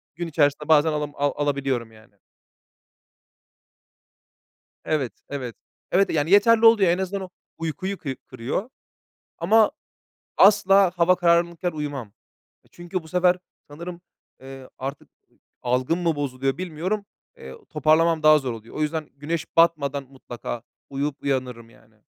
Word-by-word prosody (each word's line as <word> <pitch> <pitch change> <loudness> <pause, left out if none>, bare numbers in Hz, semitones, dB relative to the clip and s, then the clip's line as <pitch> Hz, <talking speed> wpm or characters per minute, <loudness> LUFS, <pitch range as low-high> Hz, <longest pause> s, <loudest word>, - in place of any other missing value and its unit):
gün 175 0 -4
içerisinde 145 -1 +1
bazen 155 0 +5
alam 150 -1 -2
a 145 +1 -1
alabiliyorum 135 -5 -1
yani. 110 -1 -20 2.7
Evet, 145 -6 -1 0.2
evet. 130 -5 -5 0.4
Evet 195 +2 +3
yani 155 +2 0
yeterli 225 +3 +6
oluyor. 205 -6 +6
En 175 - +1
azından 190 +1 -3
o 185 - -7 0.3
uykuyu 185 +4 -4
kı 135 -5 -5
kırıyor. 130 - -4 0.7
Ama 215 +5 +4 0.7
asla 195 -2 +6
hava 175 +1 +4
karanlıkken 170 0 +2
uyumam. 145 -6 -5
Eee, 105 - -37
çünkü 175 0 -5
bu 160 - -14
sefer 180 +1 +3 0.3
sanırım, 170 +4 -8 0.4
eee, 135 0 -11
artık 135 +2 -6
ı - - -63 0.5
algım 130 +7 0
mı 165 -2 +1
bozuluyor 135 0 -2
bilmiyorum. 185 +4 -3 0.3
Eee, 65 0 -10
toparlamam 155 +1 +2
daha 155 0 +7
zor 130 -4 -4
oluyor. 115 0 -11
O 155 - -3
yüzden 155 0 -2
güneş 155 +3 -3
batmadan 145 -4 +3
mutlaka 120 -3 -8 0.3
uyuyup 140 +1 -3
uyanırım 125 -4 -2
yani. - - -24
155 Hz, 135 wpm, -24 LUFS, 135-175 Hz, 2.7 s, daha